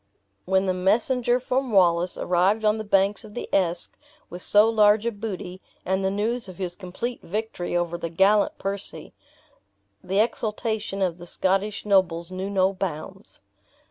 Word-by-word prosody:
When 190 Hz, +1 st, +2 dB
the 185 Hz, -, +1 dB
messenger 235 Hz, +6 st, +1 dB
from 255 Hz, 0 st, -2 dB
Wallace 175 Hz, -2 st, +3 dB
arrived 190 Hz, +5 st, +1 dB
on 215 Hz, +1 st, +2 dB
the -, -, -3 dB
banks 200 Hz, +1 st, +1 dB
of 210 Hz, -1 st, -13 dB
the -, -, -5 dB
Esk 175 Hz, -2 st, +3 dB, 0.4 s
with 175 Hz, +1 st, -7 dB
so 210 Hz, +3 st, +6 dB
large 215 Hz, -1 st, +4 dB
a 235 Hz, -, +1 dB
booty, 195 Hz, -4 st, -6 dB, 0.2 s
and 190 Hz, +1 st, 0 dB
the 190 Hz, -, +1 dB
news 220 Hz, +4 st, -2 dB
of 185 Hz, -2 st, -11 dB
his 180 Hz, -2 st, -4 dB
complete 205 Hz, +6 st, -5 dB
victory 190 Hz, -2 st, -3 dB
over 170 Hz, 0 st, -2 dB
the 170 Hz, -, -4 dB
gallant 195 Hz, +5 st, +2 dB
Percy, 195 Hz, 0 st, -6 dB, 0.9 s
the 190 Hz, +2 st, 0 dB
exultation 220 Hz, -2 st, -1 dB
of 180 Hz, -2 st, -2 dB
the 175 Hz, -, -9 dB
Scottish 195 Hz, +4 st, -1 dB
nobles 180 Hz, -4 st, +1 dB
knew 185 Hz, +1 st, -4 dB
no 190 Hz, -1 st, +2 dB
bounds. 180 Hz, -5 st, -6 dB
195 Hz, 160 wpm, -24 LUFS, 180-215 Hz, 0.9 s, so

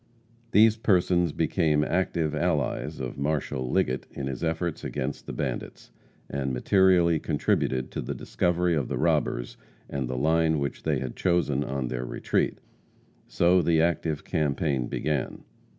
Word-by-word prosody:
These 110 Hz, 0 st, +5 dB
persons 90 Hz, -5 st, +2 dB
became 80 Hz, -1 st, +1 dB
active 85 Hz, -2 st, 0 dB
allies 75 Hz, -7 st, -1 dB
of 65 Hz, +1 st, -5 dB
Marshal 70 Hz, -3 st, -1 dB
Liggett 65 Hz, +1 st, 0 dB
in 70 Hz, -, -6 dB
his 70 Hz, +3 st, -4 dB
efforts 80 Hz, 0 st, -2 dB
against 65 Hz, +2 st, -4 dB
the -, -, -4 dB
bandits, -, -, -5 dB, 0.4 s
and 70 Hz, -1 st, -2 dB
materially 85 Hz, +4 st, +4 dB
contributed 65 Hz, -3 st, 0 dB
to -, -, -3 dB
the -, -, -4 dB
discovery 90 Hz, 0 st, 0 dB
of 75 Hz, -6 st, 0 dB
the -, -, -3 dB
robbers -, -, 0 dB, 0.3 s
and 70 Hz, -3 st, -3 dB
the 65 Hz, 0 st, -3 dB
line 80 Hz, +3 st, +2 dB
which 70 Hz, -1 st, -3 dB
they 75 Hz, -3 st, 0 dB
had 65 Hz, -1 st, -5 dB
chosen 85 Hz, -6 st, +1 dB
on 65 Hz, -2 st, -3 dB
their 60 Hz, 0 st, -3 dB
retreat. 60 Hz, -, -1 dB, 0.7 s
So 85 Hz, +9 st, +3 dB
the 85 Hz, -2 st, +2 dB
active 80 Hz, -2 st, 0 dB
campaign 70 Hz, -4 st, 0 dB
began. 75 Hz, -4 st, -2 dB
75 Hz, 145 wpm, -27 LUFS, 65-85 Hz, 0.7 s, These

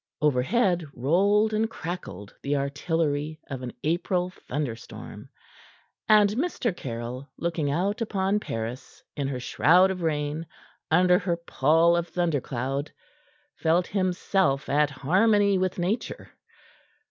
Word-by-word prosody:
Overhead 170 Hz, -, +2 dB
rolled 200 Hz, -, +3 dB
and 220 Hz, +1 st, +1 dB
crackled 160 Hz, -, -7 dB
the 140 Hz, +1 st, -1 dB
artillery 150 Hz, +1 st, -1 dB
of 130 Hz, -2 st, -4 dB
an 125 Hz, -1 st, -5 dB
April 175 Hz, +3 st, 0 dB
thunderstorm, 135 Hz, -9 st, -6 dB, 0.8 s
and 210 Hz, -2 st, +6 dB
Mr. 240 Hz, -, -1 dB
Caryll, 125 Hz, 0 st, -6 dB
looking 165 Hz, -4 st, -1 dB
out 190 Hz, +9 st, -1 dB
upon 200 Hz, -2 st, 0 dB
Paris 115 Hz, -, -6 dB
in 140 Hz, -2 st, -2 dB
her 135 Hz, -2 st, -3 dB
shroud 180 Hz, +9 st, +4 dB
of 185 Hz, -1 st, -5 dB
rain, 155 Hz, 0 st, -2 dB, 0.4 s
under 180 Hz, +2 st, +5 dB
her 175 Hz, -2 st, -1 dB
pall 165 Hz, +1 st, +3 dB
of 170 Hz, 0 st, -1 dB
thundercloud, 140 Hz, -5 st, -2 dB, 0.7 s
felt 170 Hz, +2 st, +2 dB
himself 185 Hz, -6 st, 0 dB
at 150 Hz, +1 st, +3 dB
harmony 195 Hz, +8 st, +3 dB
with 185 Hz, -1 st, -1 dB
Nature. 190 Hz, +7 st, -3 dB
165 Hz, 115 wpm, -26 LUFS, 140-190 Hz, 0.8 s, and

